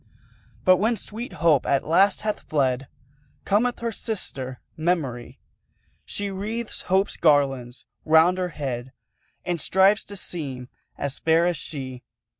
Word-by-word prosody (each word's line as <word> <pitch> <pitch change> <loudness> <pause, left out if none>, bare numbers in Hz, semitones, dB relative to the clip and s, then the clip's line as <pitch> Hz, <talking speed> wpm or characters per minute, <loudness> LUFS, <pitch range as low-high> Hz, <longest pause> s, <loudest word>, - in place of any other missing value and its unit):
But, 185 0 +7
when 220 +5 +2
sweet 230 +4 -7
Hope 155 -6 +3
at 140 -1 +2
last 190 +5 +3
hath 215 0 -1
fled, 135 -3 0 0.6
Cometh 235 +5 +1
her 230 0 -1
sister, 135 - -4 0.2
Memory; 155 -8 -2 0.7
She 205 -1 -4
wreathes 215 +4 -4
Hope's 190 +2 +2
garlands 135 -5 +2 0.2
round 160 +4 +5
her 180 -1 -1
head, 130 -5 -5 0.5
And 175 -3 -1
strives 195 +3 +4
to 205 - -8
seem 135 -10 -4 0.3
as 140 -1 -3
fair 165 +1 +3
as 175 -2 +1
she. 130 -4 -6
165 Hz, 130 wpm, -24 LUFS, 135-200 Hz, 0.7 s, But